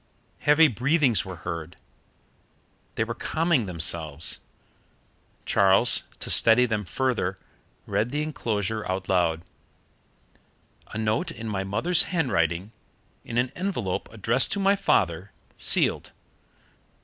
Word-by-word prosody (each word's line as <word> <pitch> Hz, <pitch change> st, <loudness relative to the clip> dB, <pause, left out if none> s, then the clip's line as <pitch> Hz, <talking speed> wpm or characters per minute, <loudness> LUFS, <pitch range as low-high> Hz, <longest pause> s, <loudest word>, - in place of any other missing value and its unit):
Heavy 150 Hz, +2 st, +5 dB
breathings 130 Hz, -, +1 dB
were 95 Hz, -1 st, -7 dB
heard. 85 Hz, -1 st, -6 dB, 1.2 s
They -, -, 0 dB
were 115 Hz, +1 st, -4 dB
calming 155 Hz, -, 0 dB
themselves. 80 Hz, -3 st, -1 dB, 1.1 s
Charles, 100 Hz, +4 st, +4 dB
to -, -, -2 dB
steady 115 Hz, +2 st, +5 dB
them 110 Hz, -3 st, -2 dB
further, 115 Hz, -5 st, -2 dB, 0.5 s
read 115 Hz, -, -1 dB
the 145 Hz, +3 st, -2 dB
enclosure 110 Hz, -8 st, -3 dB
out 95 Hz, 0 st, -3 dB
loud: 85 Hz, -3 st, +1 dB, 1.4 s
"A -, -, -8 dB
note 110 Hz, +10 st, -1 dB
in 115 Hz, -8 st, -7 dB
my 100 Hz, -3 st, -2 dB
mother's 115 Hz, -, +1 dB
handwriting, 100 Hz, -, -1 dB, 0.5 s
in 115 Hz, -, -5 dB
an 125 Hz, +1 st, +1 dB
envelope 180 Hz, -, -3 dB
addressed 115 Hz, +4 st, +2 dB
to 200 Hz, -, -2 dB
my 195 Hz, +1 st, +3 dB
father, 95 Hz, -, 0 dB, 0.2 s
sealed. -, -, +2 dB
110 Hz, 115 wpm, -25 LUFS, 95-135 Hz, 1.4 s, Heavy